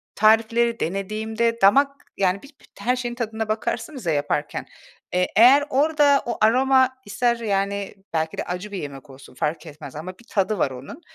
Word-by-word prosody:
tarifleri 230 +2 +3
denediğimde 220 +5 -2
damak, 275 +9 +5 0.3
yani, 190 0 +1
bit 280 0 -17
bit - - -18
her 250 +1 +1
şeyin 240 -1 -4
tadına 220 -2 -3
bakarsınız 235 - -3
ya 165 - +1
yaparken, 145 0 -2 0.5
eee, 180 0 +2
eğer 255 +6 +7
orada 290 0 +3
o 240 - -3
aroma 260 +4 +4 0.2
ister, 235 +4 +1
yani, 200 -2 -2 0.2
belki 160 0 -1
de - - -2
acı 180 +4 -5
bir 200 - -4
yemek 140 -2 -8
olsun 135 -1 -14
fark 160 +6 -2
etmez 145 -2 -10
ama 170 +5 -6
bir 235 - -18
tadı 200 +1 0
var 135 - +1
onun. 135 - -10
215 Hz, 170 wpm, -23 LUFS, 180-240 Hz, 0.5 s, eğer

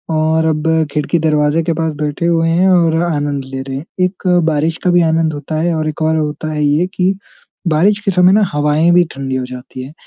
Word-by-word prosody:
और 160 +1 +1
अब 155 0 -1 0.2
खिड़की-दरवाज़े 150 0 +1
के 165 0 -1
पास 160 -1 -2
बैठे 150 +3 -2
हुए 165 -1 +2
हैं 180 +3 +2
और 170 -3 +3
आनंद 145 -4 -2
ले 135 0 -6
रहे 135 0 -5
हैं। 150 - -7 0.2
एक 185 0 -5 0.2
बारिश 160 +2 0
का 180 - +2
भी 175 0 +4
आनंद 160 -1 +1
होता 145 +2 -6
है 170 0 0
और 155 0 -2
एक 155 - -7
और 160 0 +1
होता 155 0 -3
है 150 -1 -1
ये 150 +5 +1
कि 185 +1 +1 0.5
बारिश 190 +7 +2
के 195 - +2
समय 180 0 +4
ना 215 - +4
हवाएँ 150 +3 +2
भी 175 0 +5
ठंडी 135 -1 -4
हो 130 -1 -2
जाती 125 0 -9
हैं। 140 +4 -11
160 Hz, 220 wpm, -15 LUFS, 150-170 Hz, 0.5 s, भी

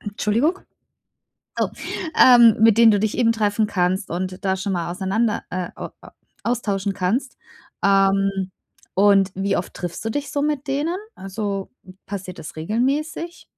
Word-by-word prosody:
Entschuldigung. 225 - 0 1.0
Oh - - +2 0.5
ähm, 240 -3 +8
mit 225 -1 +6
denen 230 -1 +8
du 205 - +3
dich 215 +1 -1
eben 230 -2 +3
treffen 215 -1 +1
kannst 185 +1 0
und 185 +2 -4
da 190 -1 +1
schon 190 +1 -3
mal 170 -2 -2
auseinander, 200 +5 -1
äh 180 -1 -3
a - - -7
a - - -15 0.3
austauschen 205 -5 -1
kannst. 220 +10 -1 0.5
Ähm, 195 -1 +2 0.4
und 195 -1 +4
wie 195 +1 0
oft 175 - -4
triffst 175 +3 -6
du 225 - -1
dich 290 +5 -4
so 285 - 0
mit 295 -1 -1
denen? 295 +6 -1 0.2
Also, 195 0 -4 0.4
passiert 190 -2 -6
das 155 - -9
regelmäßig? 275 - -2
205 Hz, 150 wpm, -22 LUFS, 190-235 Hz, 1.0 s, ähm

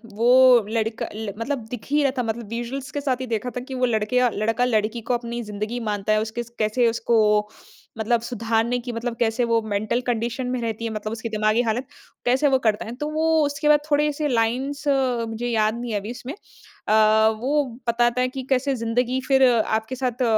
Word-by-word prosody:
वो 245 0 +6
लड़का 225 0 -1
ल 215 -2 -5
मतलब 240 -1 -3
दिख 240 -5 -6
ही 295 +1 +3
रहा 275 - +3
था 250 - +1
मतलब 225 0 -4
विजुअल्स 245 +3 -5
के 290 - -3
साथ 260 -3 -1
ही - - -2
देखा 230 +1 -2
था - - -2
कि 265 - -5
वो 255 0 +1
लड़के 225 +1 +1 0.2
लड़का-लड़की 225 +1 0
को 235 - -2
अपनी 235 0 -3
ज़िंदगी 215 +3 -4
मानता 210 -1 -1
है, 215 - +2
उसके 220 +2 -4 0.2
कैसे 220 +3 +2
उसको 215 -2 +2 0.5
मतलब 225 +1 +1
सुधारने 230 +1 0
की 245 0 -6
मतलब 230 +1 -3
कैसे 230 +1 +1
वो 230 -1 +2
मेंटल 215 +3 -1
कंडीशन 240 +1 -1
में 250 0 -2
रहती 230 0 -3
है 225 - -2
मतलब 215 0 -4
उसकी 230 0 -5
दिमागी 215 +2 +2
हालत, 240 +3 -1 0.4
कैसे 260 +4 +3
वो 270 -1 +4
करता 220 -4 0
है। 225 - -6
तो 295 +4 -4
वो 315 +1 -1 0.2
उसके 285 +1 -2
बाद 300 0 +6
थोड़े-से 295 0 +1
लाइन्स 255 +4 0
मुझे 240 -4 0
याद 220 -2 +1
नहीं 240 -1 -4
है 210 - 0
अभी 205 +3 -6
उसमें, 250 +3 -7 0.5
अ, - - +2 0.5
वो 285 +5 +1 0.2
बताता 240 +1 +2
है 255 - +2
कि 265 - -3
कैसे 270 +1 +1
ज़िंदगी 245 +2 0
फिर 270 -1 +4
आपके 220 0 +1
साथ 250 -1 -2
235 Hz, 200 wpm, -23 LUFS, 220-255 Hz, 0.5 s, वो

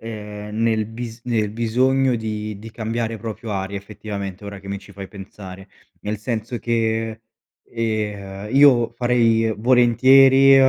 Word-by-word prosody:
ehm, 105 -1 -7
nel 110 -2 +1
bis 115 +1 -7
nel 110 -4 0
bisogno 125 +3 +2
di 105 -2 -4
di 110 +2 -10
cambiare 115 0 -3
proprio 110 0 -6
aria, 95 0 -3
effettivamente 100 -1 -7
ora 100 -1 -8
che 100 - -14
mi 100 - -3
ci 100 - -16
fai 100 -1 -8
pensare. 95 -1 -11 0.3
Nel 105 +1 -3
senso 115 +2 -4
che, 115 -1 -1 0.5
ehm, 105 -3 -3
io 125 -5 +6
farei 115 -2 +2
volentieri, 130 +3 +6
110 Hz, 135 wpm, -21 LUFS, 105-120 Hz, 0.5 s, io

